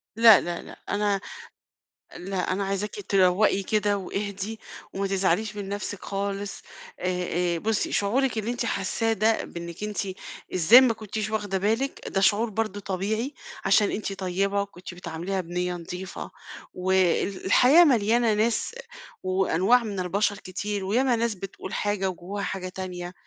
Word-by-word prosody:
لأ، 225 -3 +8
لأ، 175 0 -4
لأ، - - -12
أنا 205 -1 +1 1.0
لأ، 185 0 -2
أنا 200 +2 0
عايزاكِ 195 +2 -2
تروقي 195 +1 +3
كده 205 0 +1
واهدي 200 +2 -4 0.3
وما 195 0 -1
تزعليش 195 +2 0
من 200 -1 -5
نفسِك 205 -1 -5
خالص 200 0 -3 0.4
آآ، - - -5 0.5
آآ، - - -1
بُصّي 220 +2 0
شعورِك 240 +4 +1
اللي 220 +2 -1
أنتِ 240 -1 -2
حاساه 225 +3 0
ده 220 +2 +2
بإنِّك 170 +3 -7
أنتِ 210 -1 -3 0.5
إزاي 190 +9 +8
ما 245 -3 +4
كنتيش 215 -1 -4
واخدة 205 -3 -1
بالِك 225 +8 0
ده 195 - 0
شعور 210 +4 +3
برضه 215 -1 -2
طبيعي، 210 +8 -2 0.3
عشان 200 +1 +4
أنتِ 200 -1 -3
طيبة 195 +1 0
وكنتِ 185 -2 -8
بتعامليها 175 +2 -4
بنِية 180 +1 -2
نضيفة، 180 +2 -7 0.4
وال 190 +1 +1
الحياة 265 - +7
مليانة 235 -4 +3
ناس 225 - 0 0.5
وأنواع 190 +5 +3
من 200 -4 -4
البشر 200 +3 0
كتير 200 +2 -4
وياما 245 +5 +2
ناس 230 -2 0
بتقول 190 0 -8
حاجة 205 -2 0
وجواها 190 +3 -5
حاجة 185 -1 -3
تانية، 180 -1 -6
200 Hz, 145 wpm, -26 LUFS, 185-215 Hz, 1.0 s, لأ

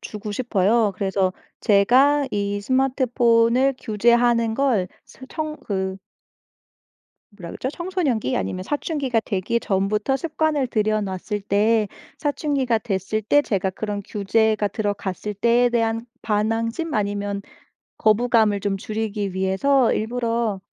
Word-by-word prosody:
주고 210 0 -6
싶어요. 215 -2 +1
그래서 190 -1 0 0.3
제가 260 +8 +4
이 205 0 -2
스마트폰을 250 0 +2
규제하는 235 +1 +2
걸 240 -9 +1 0.2
스 260 - -14
청 310 -1 -4
그 190 -2 -2 1.4
뭐라 180 -5 -9
그러죠? 260 - -4
청소년기 335 - -1
아니면 140 - -3
사춘기가 280 - -1
되기 220 +3 -1
전부터 210 +7 0
습관을 310 -2 0
들여 215 -2 0
놨을 195 +1 -4
때 215 +2 +2 0.3
사춘기가 280 -5 0
됐을 210 0 -2
때 290 +8 +3
제가 195 -6 -1
그런 205 +1 -4
규제가 210 +1 +1
들어갔을 205 -1 -3
때에 235 +4 +3
대한 230 0 0 0.2
반항심 225 +7 -1
아니면 205 -1 -2 0.6
거부감을 220 -2 +3
좀 195 0 -1
줄이기 210 -2 -3
위해서 195 +8 +2
일부러 230 -3 -1
220 Hz, 275 characters per minute, -22 LUFS, 200-245 Hz, 1.4 s, 제가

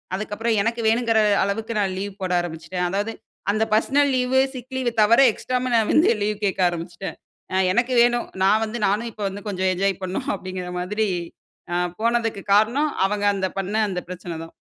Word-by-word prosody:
அதுக்கப்புறம் 215 +2 -1
எனக்கு 230 +2 -1
வேணுங்கிற 225 0 +3 0.2
அளவுக்கு 220 +3 -2
நான் 190 -2 0
லீவ் 200 0 -4
போட 185 -1 -2
ஆரம்பிச்சுட்டேன். 175 +2 -4
அதாவது 205 +4 -2 0.4
அந்த 215 +2 +1
பர்ஷனல் 280 +5 +3
லீவு, 255 +1 +2
சிக் 255 +1 -8
லீவு 250 -2 0
தவர 230 +4 +5
எக்ஸ்ட்ராவும் 250 +2 -2
நான் 220 -2 +2
வந்து 325 +5 +5
லீவ் 210 0 -1
கேட்க 190 -1 0
ஆரம்பிச்சுட்டேன் 175 +2 -6 0.4
ஆ, - - 0 0.2
எனக்கு 240 +5 +1
வேணும், 240 0 +2 0.2
நான் 215 +3 +4
வந்து 220 +2 -5
நானும் 220 +4 0
இப்போ 210 - -7
வந்து 200 +1 -8
கொஞ்சம் 190 -1 0
என்ஜாய் 195 +1 -1
பண்ணும் 185 0 -3
அப்பிடிங்கிற 185 -1 -6
மாதிரி 210 +4 -1 0.7
ஆ, - - 0 0.2
போனதுக்கு 230 -2 0
காரணம் 240 +9 +3 0.2
அவங்க 205 0 -2
அந்த 190 -1 0
பண்ண 195 +2 -3
அந்த 180 -2 -2
பிரச்சன 180 -2 -6
தான். 165 - -12
210 Hz, 175 wpm, -23 LUFS, 190-235 Hz, 0.7 s, தவர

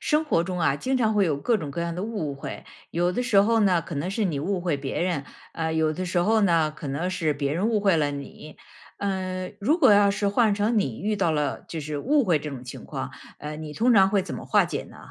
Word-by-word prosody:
生 305 0 +2
活 170 - +1
中 180 -1 -3
啊 145 -4 +2
经 260 - -1
常 220 -3 +2
会 205 -1 +4
有 155 -5 0
各 230 +10 +1
种 150 -8 -5
各 155 - -4
样 170 0 -2
的 180 - -4
误 205 -10 -3
会， 140 - -7 0.3
有 175 +1 +1
的 245 - -1
时 220 -5 +3
候 225 +3 +4
呢 185 -5 +3
可 165 - -7
能 145 +6 -2
是 210 +2 -1
你 155 -6 -2
误 185 +4 -1
会 170 -4 0
别 140 -1 -4
人， 170 -5 -1 0.3
呃， 160 -1 -2
有 160 -1 +1
的 185 - -3
时 180 0 -1
候 220 +5 +3
呢， 165 -5 +3
可 155 0 -9
能 145 +7 -2
是 165 -4 0
别 140 0 -2
人 195 +7 +1
误 220 -2 +1
会 195 -4 +3
了 145 -2 +1
你。 145 +2 -9 0.4
呃， 185 -2 -3
如 300 - +2
果 225 - +6
要 205 0 +5
是 200 0 0
换 215 0 +3
成 215 +2 +1
你 130 - -2
遇 210 +1 -1
到 170 - +1
了 150 -2 -1
就 165 - -5
是 150 0 -4
误 285 - +2
会 170 -7 +3
这 150 +1 -6
种 130 -3 -7
情 125 - -9
况， - - -5 0.3
呃， 150 +1 -6
你 155 -1 -7
通 240 +7 +3
常 190 -2 +6
会 200 -2 +2
怎 190 - -6
么 - - -7
化 - - +4
解 - - -4
呢？ - - -15
180 Hz, 285 characters per minute, -25 LUFS, 155-205 Hz, 0.4 s, 果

